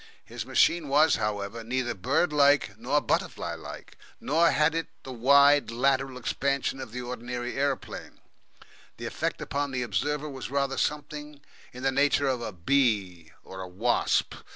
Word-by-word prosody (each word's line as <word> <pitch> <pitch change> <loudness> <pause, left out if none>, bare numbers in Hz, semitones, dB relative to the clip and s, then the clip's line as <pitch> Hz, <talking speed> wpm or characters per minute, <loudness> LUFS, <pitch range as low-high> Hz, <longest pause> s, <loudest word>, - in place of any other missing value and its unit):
His - - -7
machine 170 -3 +3
was, 150 +3 +4
however 105 +2 -3
neither 120 +1 -1
bird 140 - 0
like 145 -1 +4
nor - - +1
butterfly - - -1
like, - - -10 0.2
nor 165 +4 +3
had 155 +1 +2
it 165 -1 -2 0.2
the 130 - -8
wide, 140 +1 +5
lateral 130 +2 0
expansion 135 +2 -1
of 130 -4 -8
the 125 +1 -5
ordinary 125 0 -5
aeroplane. 140 -1 -3 0.8
The - - -7
effect - - -3
upon 145 0 -2
the 130 -2 -2
observer 145 +7 -1
was 135 -4 -7
rather 140 0 -1
something 150 0 -3 0.3
in 125 +1 -10
the 135 - +2
nature 140 +1 +2
of 130 -2 0
a 115 - -4
bee 95 - 0
or 95 0 -8
wasp. 105 +7 +1
135 Hz, 155 wpm, -27 LUFS, 120-145 Hz, 0.8 s, wide